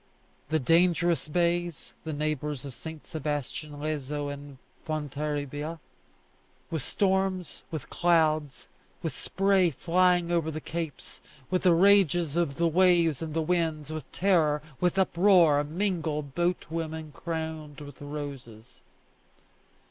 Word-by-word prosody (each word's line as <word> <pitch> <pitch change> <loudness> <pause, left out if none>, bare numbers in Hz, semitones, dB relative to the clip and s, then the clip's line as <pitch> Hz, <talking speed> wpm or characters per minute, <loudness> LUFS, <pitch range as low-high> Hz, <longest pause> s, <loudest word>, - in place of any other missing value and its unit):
The 160 - +2
dangerous 170 +3 +3
bays 175 0 -1
the 160 - -3
neighbours 150 -2 -2
of 135 - -7
St. 160 +5 -8
Sebastian, 150 0 -4
Leso, 145 -1 -3
and 140 -1 -10 0.3
Fontarabia 150 0 -3 0.9
with 160 -3 -1
storms, 190 +1 0
with 155 -5 -6
clouds, 155 -4 +2 0.4
with - - -2
spray 195 -2 +2
flying 175 +3 +2
over 165 -2 +1
the 155 0 -4
capes, 160 -2 -6 0.3
with 185 - +2
the 180 -3 +5
rages 175 -4 +4
of 170 -5 +1
the 170 +2 +2
waves 170 -3 +3
and 160 -1 -5
the 165 - +1
winds, 160 -3 -1
with 155 -3 -6
terror, 160 -6 +2 0.2
with 180 +1 +1
uproar, 175 -5 +5
mingle 160 -2 -1
boat 175 +6 -1
women 160 -1 -4
crowned 160 -3 -5
with 145 -2 -11
roses. 140 -6 -8
160 Hz, 120 wpm, -28 LUFS, 150-175 Hz, 0.9 s, the